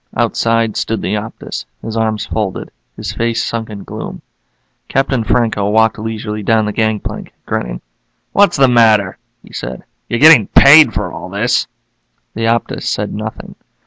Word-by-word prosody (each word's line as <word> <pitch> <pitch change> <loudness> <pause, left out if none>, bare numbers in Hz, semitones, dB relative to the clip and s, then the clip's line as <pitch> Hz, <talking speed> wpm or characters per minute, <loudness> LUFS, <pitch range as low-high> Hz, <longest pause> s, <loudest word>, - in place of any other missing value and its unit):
Outside 115 -1 +1
stood 110 -1 -2
the 95 - -1
Optus, 105 +1 -6 0.2
his 110 0 -5
arms 110 -1 -1
folded, 105 -3 -4 0.2
his - - -5
face 115 0 -1
sunk 115 -1 -4
in 105 -2 -8
gloom. - - -8 0.7
Captain 135 -3 0
Franco 110 -3 0
walked 110 +1 +2
leisurely 110 -1 -4
down 110 +1 +2
the 105 - -3
gangplank, 110 -1 -3
grinning. - - -4 0.5
"What's 200 -4 +3
the 135 -1 +5
matter?" 110 -5 +3 0.2
he - - -17
said. 65 -1 -6 0.3
"You're 120 - 0
getting 150 -8 +7
paid 150 +2 +7
for 95 -3 -3
all - - -8
this." - - 0 0.7
The 115 +1 -2
Optus 115 +1 -1
said - - -2
nothing. 110 +1 -7
110 Hz, 150 wpm, -15 LUFS, 105-115 Hz, 0.7 s, getting